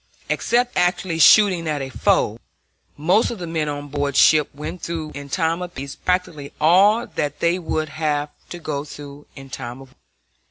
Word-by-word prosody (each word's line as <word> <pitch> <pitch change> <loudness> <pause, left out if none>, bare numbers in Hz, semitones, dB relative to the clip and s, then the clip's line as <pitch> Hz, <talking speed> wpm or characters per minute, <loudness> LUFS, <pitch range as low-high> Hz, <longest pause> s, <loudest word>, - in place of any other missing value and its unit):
Except 245 +1 0
actually 175 -1 0
shooting 185 -1 +6
at 150 -3 -2
a 135 - -6
foe, 110 -4 +1 0.6
most 180 +9 +2
of 235 - -5
the 180 - -6
men 160 -2 -2
on 145 0 -5
board 145 -1 -2
ship 155 -2 +5
went 150 +4 -7
through 160 -2 -4
in 140 0 -8
time 165 +3 0
of 180 -1 -7
peace 135 +1 -6
practically 175 -6 -2
all 200 +9 +4
that 145 - -4
they 170 +2 +1
would 155 -2 -2
have 150 -1 -2 0.2
to 175 - -6
go 150 -4 -4
through 145 -1 -11
in 135 -1 -12
time 125 -2 -7
of 135 -1 -13
war. 130 - -26
155 Hz, 185 wpm, -21 LUFS, 145-175 Hz, 0.6 s, shooting